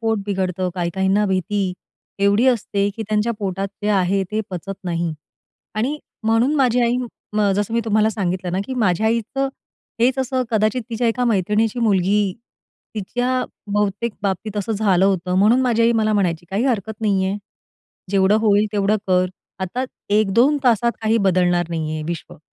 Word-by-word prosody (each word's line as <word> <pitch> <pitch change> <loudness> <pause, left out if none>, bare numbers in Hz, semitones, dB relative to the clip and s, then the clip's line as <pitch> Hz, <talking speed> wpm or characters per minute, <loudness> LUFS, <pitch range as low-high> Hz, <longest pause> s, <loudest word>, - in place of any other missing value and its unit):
पोट 225 -2 0
बिघडतं, 185 -2 -1
काही 175 -1 -1
काहींना 190 +2 +2
भीती 190 0 0 0.5
एवढी 200 +5 +3
असते, 205 -5 +1
की 220 - -3
त्यांच्या 215 +2 +1
पोटात 195 -1 -2
जे 210 - 0
आहे, 195 0 +2
ते 215 +1 0
पचत 190 +2 -5
नाही 170 -2 -1 0.6
आणि 265 +8 -1 0.2
म्हणून 225 +6 +2
माझी 250 -3 +3
आई 235 +1 +2 0.4
म 205 -1 +3
जसं 205 +2 -1
मी 235 - +2
तुम्हाला 215 0 +2
सांगितलं 185 -3 -2
ना, 185 - 0
की 260 - -4
माझ्या 215 -3 +1
आईचं 235 +5 0 0.5
हेच 255 +3 +3
असं 260 0 0
कदाचित 220 +2 +1
तिच्या 230 +1 0
एका 245 +2 0
मैत्रिणीची 215 +2 +1
मुलगी, 200 -2 +2 0.6
तिच्या 245 +5 -1 0.3
बहुतेक 210 +2 0
बाबतीत 200 +2 -2
असं 205 +2 -1
झालं 195 -3 +2
होतं, 185 -2 +1
म्हणून 220 +6 +5
माझी 230 -2 +2
आई 235 +1 +4
मला 215 -1 +1
म्हणायची, 175 -4 0
"काही 205 +6 0
हरकत 220 -4 -1
नाही 200 -3 +1
आहे, 195 +2 -1 0.7
जेवढं 195 +1 +4
होईल 210 -1 +3
तेवढं 205 +1 +2
कर. 185 0 +3 0.3
आता 240 +8 -2 0.3
1-2 230 +8 +3
तासात 235 0 +3
काही 220 +1 +2
बदलणार 175 -1 +2
नाहीये 155 -1 -3
विश्व." 170 0 -6
210 Hz, 160 wpm, -21 LUFS, 190-230 Hz, 0.7 s, म्हणून